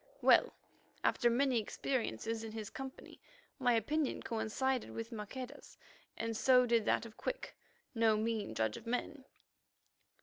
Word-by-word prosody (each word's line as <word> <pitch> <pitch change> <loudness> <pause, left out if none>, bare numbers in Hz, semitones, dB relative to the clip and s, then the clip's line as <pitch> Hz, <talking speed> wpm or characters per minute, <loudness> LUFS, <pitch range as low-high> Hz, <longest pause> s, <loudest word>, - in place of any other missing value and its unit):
Well, - - +6 0.5
after 240 - +3
many 250 0 +3
experiences 225 - -2
in 220 -1 -6
his 220 -2 -5
company, 265 0 -8 0.4
my 245 -2 +3
opinion 285 +6 0
coincided 250 +1 -1
with 225 +1 -6
Maqueda's, 250 +6 -7 0.4
and 230 0 -2
so 250 +2 +5
did 230 -2 +2
that - - +2
of 220 -1 -12
Quick, - - -4 0.4
no 225 -2 +4
mean 215 - -1
judge 110 -1 0
of 230 - -11
men. 260 +3 -3
230 Hz, 135 wpm, -35 LUFS, 220-260 Hz, 0.5 s, Well